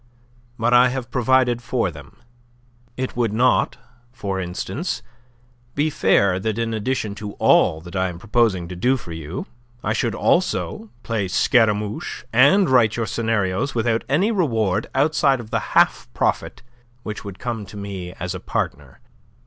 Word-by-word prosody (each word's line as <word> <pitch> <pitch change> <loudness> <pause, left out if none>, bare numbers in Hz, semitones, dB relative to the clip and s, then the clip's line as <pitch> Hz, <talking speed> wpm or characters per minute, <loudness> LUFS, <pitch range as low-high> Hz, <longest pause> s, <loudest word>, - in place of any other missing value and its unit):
But 120 +2 +1
I 125 +1 +6
have 125 -2 -5
provided 125 -1 +2
for 115 -5 -1
them. 75 -3 -13 0.8
It 130 0 -3
would 120 -3 0
not, 120 +4 +2 0.3
for 100 -6 -4
instance, 115 - -4 0.7
be 150 +2 +1
fair 95 -8 +3
that 110 +2 -2
in 115 -1 -1
addition 110 -1 -2
to 105 -1 -5
all 80 - +3
that 85 +2 -11
I 95 0 +1
am 85 - -8
proposing 105 -3 +1
to 90 - -6
do 125 +9 +2
for 85 - -10
you, 80 +2 -6 0.4
I - - 0
should - - -1
also 110 - 0
play 110 -4 -1
Scaramouche 105 0 +1
and 145 - +5
write 120 -4 +4
your 115 - -1
scenarios 110 +2 -1
without 115 -1 +1
any 180 +11 +2
reward 115 - 0
outside 140 -1 +3
of 115 -2 -10
the 115 - +1 0.2
half - - +4
profit - - -1 0.4
which 105 -1 -6
would 100 -2 -8
come 120 -2 -4
to 105 - -10
me 95 -3 -6
as 90 -1 -5
a 95 - -5
partner. 70 -5 -4
110 Hz, 155 wpm, -22 LUFS, 95-125 Hz, 0.8 s, I